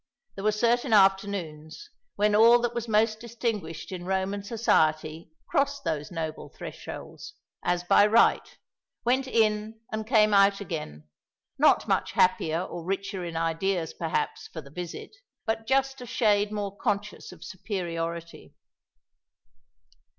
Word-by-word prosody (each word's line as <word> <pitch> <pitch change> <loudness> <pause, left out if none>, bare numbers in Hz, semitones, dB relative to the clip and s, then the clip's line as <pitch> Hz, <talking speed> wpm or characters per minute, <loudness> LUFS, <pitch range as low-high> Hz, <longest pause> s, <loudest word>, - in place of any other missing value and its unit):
There 195 - -8
were 215 - +3
certain 235 +3 +1
afternoons 190 -6 +1 0.2
when 210 +1 +2
all 230 +3 +7
that 240 0 -1
was 235 -1 -4
most 215 0 +2
distinguished 220 -9 -4
in 180 -2 -6
Roman 190 +2 -1
Society 160 -7 0 0.2
crossed 280 -2 0
those 155 -3 -2
noble 160 -3 -5
thresholds, 420 - -9 0.3
as 175 0 0
by 205 +3 +5
right 225 +2 +3 0.5
went 260 +2 +2
in 220 -2 0
and 215 0 -4
came 215 -3 +4
out 200 0 +5
again, 150 - -6 0.5
not - - +4
much - - 0
happier 170 -2 +2
or 175 -2 -7
richer 195 +1 -3
in 170 -1 -5
ideas, 165 +1 -1
perhaps, 160 -2 -3
for 160 - -8
the 140 -3 -12
visit, 175 +1 -7 0.3
but 225 -1 -2
just 270 0 +1
a 245 - -8
shade 210 -5 +2
more 205 -2 -4
conscious 205 -1 -3
of - - -13
superiority. 170 -4 -5
200 Hz, 135 wpm, -27 LUFS, 170-220 Hz, 0.5 s, all